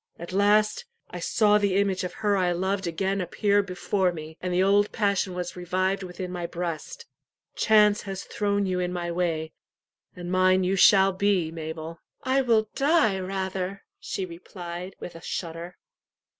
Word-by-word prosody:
At 170 +2 -8
last, 210 - +3 0.3
I - - -6
saw 210 -2 +3
the 200 -2 +1
image 195 -2 +1
of 180 - -3
her 205 -1 +4
I 180 -2 +1
loved 190 +1 -1
again 190 +4 -1
appear 205 +3 +2
before 190 0 -1
me, 160 -1 -8
and 180 - -2
the 180 +1 +2
old 205 +1 +3
passion 200 -3 0
was 180 -1 -4
revived 185 +2 -1
within 180 0 -6
my 175 -1 -4
breast. 175 - -5 0.5
Chance 210 -1 +4
has 195 -1 -5
thrown 205 -1 -1
you 185 -1 -1
in 180 0 -1
my 175 -1 -3
way, 165 -3 -2 0.6
and 175 0 -6
mine 185 0 +4
you 185 +2 +1
shall 195 0 +6
be, 190 -4 +1
Mabel." 160 0 -6 0.2
"I 265 +1 +2
will 225 -4 +2
die 275 - +3
rather," 190 0 -3 0.2
she 190 - -4
replied, 175 +1 -8
with 175 - -7
a 165 - -11
shudder. 170 +1 -5
185 Hz, 165 wpm, -26 LUFS, 175-200 Hz, 0.6 s, shall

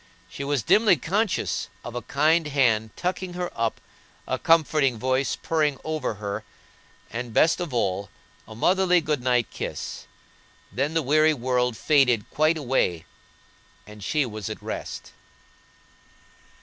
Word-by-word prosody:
She 140 - -7
was 140 -4 0
dimly 210 - +5
conscious 200 - -1 0.2
of 120 - -6
a 120 - -4
kind 160 +4 +2
hand 120 -7 +2
tucking 180 0 -3
her 180 0 -3
up, 115 -1 -1 0.5
a - - -1
comfortable 155 -6 +3
voice 130 +3 0
purring 150 -4 0
over 155 -7 -2
her, 100 -1 -5 0.7
and, 115 0 -5
best 160 +3 +4
of 175 -5 -4
all, 100 -4 -1 0.4
a 110 - -10
motherly 180 - +3
good 150 -4 -1
night 125 -2 +1
kiss, - - -6 0.6
then 140 - -1
the 165 - +2
weary 155 +3 +4
world 125 -2 0
faded 130 -8 +3
quite 155 +2 +2
away 125 - 0 0.8
and 105 -1 -12
she 150 +6 +1
was 110 -4 -6
at - - -6
rest. - - -6
140 Hz, 135 wpm, -25 LUFS, 115-160 Hz, 0.8 s, dimly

